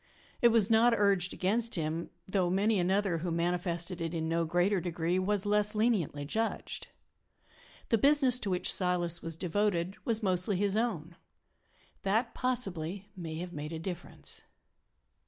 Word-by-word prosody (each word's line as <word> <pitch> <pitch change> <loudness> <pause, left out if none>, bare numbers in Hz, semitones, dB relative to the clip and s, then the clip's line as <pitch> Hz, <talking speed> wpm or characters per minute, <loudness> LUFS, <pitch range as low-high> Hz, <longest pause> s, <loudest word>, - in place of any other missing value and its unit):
It 240 - +7
was 225 -2 +3
not 230 +1 +5
urged 195 -3 +2
against 225 +5 0
him, 160 0 -2 0.2
though 190 -2 +1
many 200 +3 +2
another, 185 -1 +1
who 175 +2 -3
manifested 170 +1 -1
it 165 +1 -3
in 160 -1 -2
no 165 +1 0
greater 175 +4 +1
degree, 175 +1 -1
was 200 +1 +1
less 210 +1 +2
leniently 205 - 0
judged. 225 +9 -3 1.0
The 230 - +3
business 275 -1 +4
to 205 - -3
which 180 -1 +3
Silas 175 -2 +1
was 165 -1 -4
devoted 185 +1 -1
was 225 -1 -1
mostly 185 0 +1
his 200 +1 0
own 180 -8 -2 0.8
that, 220 +5 0
possibly, 200 -6 -2
may 165 -4 -6
have 175 +2 -6
made 150 +2 -5
a - - -3
difference. 175 +1 -7
185 Hz, 150 wpm, -31 LUFS, 170-210 Hz, 1.0 s, It